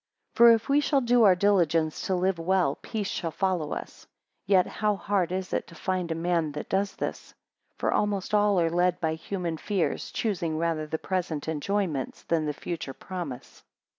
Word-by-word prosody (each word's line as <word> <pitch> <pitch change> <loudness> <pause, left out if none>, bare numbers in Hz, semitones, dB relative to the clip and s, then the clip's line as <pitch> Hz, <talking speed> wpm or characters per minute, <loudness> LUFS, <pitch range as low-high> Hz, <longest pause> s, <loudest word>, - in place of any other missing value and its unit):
7 - - -17
For, 235 0 +9
if 225 -1 +2
we 280 +1 +4
shall 285 -1 +2
do 245 0 +3
our 190 -2 +7
diligence 170 -5 +2
to 190 - +1
live 185 0 0
well, 180 -4 +2
peace 215 -3 -3
shall 170 - -2
follow 175 -3 -1
us. - - -7 0.4
And - - -6
yet 185 -1 +5
how 210 -1 0
hard 195 -3 0
is 185 0 -3
it - - -1
to 165 - -14
find 180 -1 -2
a - - 0
man 165 -2 0
that 150 - -6
does 195 0 0
this? - - -5 0.4
For - - 0
almost 205 -1 -1
all 205 -2 +4
are 165 -1 +2
led 180 +1 +2
by 160 -1 0
human 170 0 -4
fears, 195 0 -1
choosing 175 -8 -2
rather 160 -2 -1
the 160 - -2
present 170 -5 -3
enjoyments, 160 -2 -2
than 160 -2 0
the - - +1
future 155 -2 -5
promise. 175 -9 -7
180 Hz, 195 wpm, -27 LUFS, 165-200 Hz, 0.4 s, For